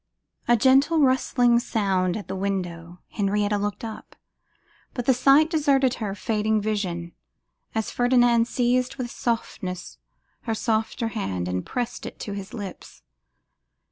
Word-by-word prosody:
A 240 - +5
gentle 275 +7 +4
rustling 250 -3 +3
sounded 190 -5 0
at 205 - -8
the - - -4
window: 180 -3 -4
Henrietta 205 0 0
looked 205 0 -3
up, 220 -1 -9 0.8
but 245 -3 -3
the 265 - +5
sight 275 +5 +5
deserted 280 -5 +2
her 205 -5 -4
fading 215 +1 0
vision, 190 -5 -2 0.6
as 220 -1 -1
Ferdinand 245 -1 +3
seized 250 +1 +1
with 240 -2 -5
softness 185 -6 -4 0.5
her 225 -2 -1
softer 225 +1 -1
hand, 95 - -3
and 90 0 -2
pressed 245 -1 -4
it - - -9
to 205 - -5
his 200 -1 -7
lips. 200 -5 -9
220 Hz, 135 wpm, -24 LUFS, 195-245 Hz, 0.8 s, A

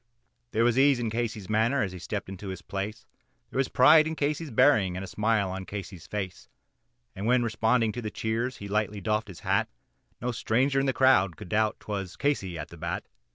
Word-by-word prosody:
There 115 0 +1
was 120 +1 +3
ease 140 -1 +5
in 115 -2 -2
Casey's 110 -4 -3
manner 110 +5 +2
as 95 - -3
he 90 - -8
stepped 100 +4 -4
into 95 +1 -8
his 95 -2 -6
place, 100 +4 -5 0.5
There - - -2
was 135 - +2
pride 155 +4 +6
in 160 - -3
Casey's 150 +1 -1
bearing 110 -7 +4
and 95 - -4
a - - -6
smile 105 -1 +1
on 95 0 -5
Casey's 95 -4 -7
face, 95 -4 -5 0.7
And 100 +3 -3
when 125 0 +4
responding 115 0 +2
to 120 - -5
the 110 - -3
cheers 115 +4 -2
he 100 - -7
lightly 105 0 -1
doffed 105 +2 -1
his 95 -4 -11
hat, - - +1 0.5
No 125 +2 -2
stranger 130 +4 +1
in 135 - +1
the - - +3
crowd 115 - +4
could - - -10
doubt, 110 0 +1
'twas 100 -4 -5
Casey 95 -12 -1
at 75 - -6
the - - -12
bat. - - -4
110 Hz, 210 wpm, -28 LUFS, 100-125 Hz, 0.7 s, pride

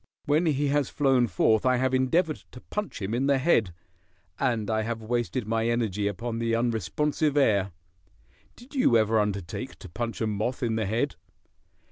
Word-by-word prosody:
When 155 +3 +2
he 145 -1 +1
has 145 -2 +1
flown 135 -4 +2
forth 110 +3 +2
I 130 0 +3
have 130 +1 0
endeavored 155 +5 +2 0.2
to 125 - -9
punch 210 - -5
him 100 +4 -2
in 130 +3 +1
the 140 -1 +4
head, 130 - +2 0.7
and 120 -6 0
I 110 0 0
have 115 0 -4
wasted 120 +1 -1
my 115 +1 0
energy 110 -4 0
upon 115 +4 -3
the 115 0 +1
unresponsive 135 - 0
air. 100 -8 +3 0.8
Did 245 +4 -16
you 255 - +4
ever 110 0 +3
undertake 100 -5 -3
to - - -11
punch 115 +6 -4
a 110 - 0
moth 110 +5 -2
in 115 -2 0
the 110 -3 -1
head?" 120 +8 -1
120 Hz, 175 wpm, -27 LUFS, 110-135 Hz, 0.8 s, the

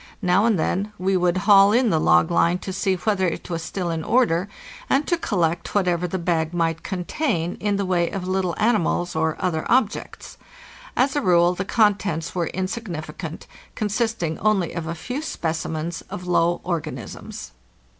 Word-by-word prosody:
Now 185 +3 +3
and 225 -4 +3
then 195 +5 -1
we 190 +2 0
would 180 0 +2
haul 200 -1 +7
in 235 0 +3
the 160 - +2
log 85 - +4
line 170 +1 +3
to 190 +1 -6
see 190 0 +1
whether 190 0 0
it 175 - -5
was 165 -1 -2
still 175 0 -3
in 160 -1 -3
order 200 -6 +2 0.4
and 275 +2 +2
to 345 - +2
collect 175 - -1
whatever 180 -3 +1
the 190 - -3
bag 170 -1 -1
might 165 -1 0
contain 180 - -2
in 205 -1 0
the 200 0 -1
way 175 -2 +1
of 185 -2 -5
little 185 -2 0
animals 205 -6 +1
or 160 0 +1
other 165 -4 -1
objects. 235 -3 -1 0.6
As 265 +2 +2
a 290 - +1
rule 175 -4 +4
the 190 +1 -4
contents 205 -6 +1
were 175 -3 -1
insignificant, 180 -5 -5 0.3
consisting 215 -6 -1
only 205 -5 +1
of 170 -2 -4
a 165 - -3
few 250 - -5
specimens 160 - -3
of 180 - -6
low 175 -1 +2
organisms. 155 - -5
180 Hz, 170 wpm, -23 LUFS, 165-205 Hz, 0.6 s, haul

